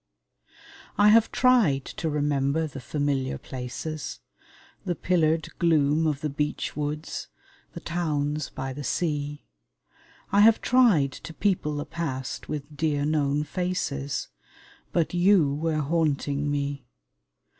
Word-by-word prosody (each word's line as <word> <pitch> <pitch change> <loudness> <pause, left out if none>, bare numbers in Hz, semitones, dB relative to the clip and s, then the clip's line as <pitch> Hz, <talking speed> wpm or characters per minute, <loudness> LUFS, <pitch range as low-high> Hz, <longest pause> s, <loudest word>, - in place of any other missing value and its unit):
I 205 +1 +6
have 225 +1 +5
tried 220 - +3
to 160 - -4
remember 145 +1 +1
the 140 -3 -7
familiar 140 -1 -1
places, 135 +4 -6 0.6
The 175 -2 -1
pillared 160 -2 +1
gloom 160 -2 +3
of 145 -2 -1
the 150 - -1
beechwoods, 150 +1 -3 0.5
the - - -8
towns 150 -4 -1
by 130 0 -5
the 145 +2 -6
sea, 145 0 -2 0.9
I 200 - +4
have 220 +2 +7
tried 220 - +4
to 165 +4 -10
people 180 -7 0
the 145 - -3
past 135 -6 -4
with 150 0 -5
dear 145 -2 0
known 150 -1 +1
faces, 150 -4 -2 0.6
But 170 -1 0
you 175 -5 +4
were 155 +1 -1
haunting 145 -2 0
me. 140 -2 -2
150 Hz, 120 wpm, -26 LUFS, 145-165 Hz, 0.9 s, have